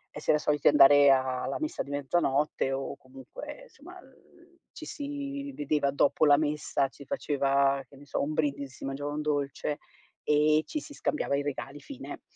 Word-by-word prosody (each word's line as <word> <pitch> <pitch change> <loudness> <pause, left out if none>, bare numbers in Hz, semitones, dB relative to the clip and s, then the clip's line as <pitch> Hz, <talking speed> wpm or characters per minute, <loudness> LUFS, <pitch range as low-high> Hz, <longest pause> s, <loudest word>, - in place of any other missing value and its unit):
e 150 - -6
si - - -8
era 150 - +5
soliti 150 -1 +3
andare 145 0 +7
alla 130 -1 0
messa 310 0 -3
di - - -13
mezzanotte 145 -1 0
o 135 +1 -3
comunque, 135 - -10
insomma, - - -14
ehm, - - -16
ehm, 345 0 -24
ci 315 - -10
si 280 -1 -5
vedeva 145 -1 0
dopo 140 +2 +2
la 145 -1 +6
messa, 150 -2 0
si 140 - -14
faceva, 140 -1 +1
che 135 - -17
ne 145 - -14
so, 140 - -2
un 150 +2 -2
brindisi, 140 -3 -2
si - - -8
mangiava 145 +2 -4
un 150 - -2
dolce 145 0 -2 0.4
e 150 +1 +3
ci 305 - -3
si 295 0 -11
scambiava 285 - -1
i 140 - 0
regali, 140 0 -5
fine. 280 - -9
145 Hz, 185 wpm, -29 LUFS, 140-155 Hz, 0.4 s, andare